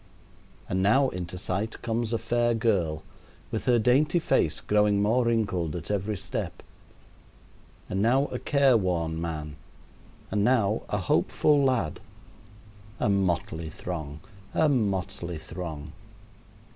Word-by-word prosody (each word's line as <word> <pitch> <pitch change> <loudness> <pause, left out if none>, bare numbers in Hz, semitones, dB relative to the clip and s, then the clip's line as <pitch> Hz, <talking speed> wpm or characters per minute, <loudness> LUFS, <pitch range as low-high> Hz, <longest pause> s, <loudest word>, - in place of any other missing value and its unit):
And 95 - 0
now 130 +8 +4
into 90 -2 -6
sight 100 +5 -3
comes 115 0 -1
a 115 - +1
fair 120 0 +1
girl, 90 -9 0 0.5
with 110 - -3
her 125 -2 +4
dainty 130 +9 +3
face 80 - +1
growing 105 -1 +2
more 115 +5 +2
wrinkled 100 -9 0
at 85 +3 -5
every 105 +1 -1
step, 90 -1 -5 1.2
and 95 - -1
now 130 +6 +3
a - - -3
care 140 -3 +3
worn 85 -4 -1
man, 75 -3 -5 0.7
and 100 0 +1
now 110 -3 +2
a 105 - 0
hopeful 140 +9 +2
lad. 125 - +1 1.0
A - - +1
motley 85 -4 0
throng 80 -3 -6 0.3
a 160 - +4
motley 100 - -1
throng! 80 -2 -7
100 Hz, 125 wpm, -27 LUFS, 85-115 Hz, 1.2 s, now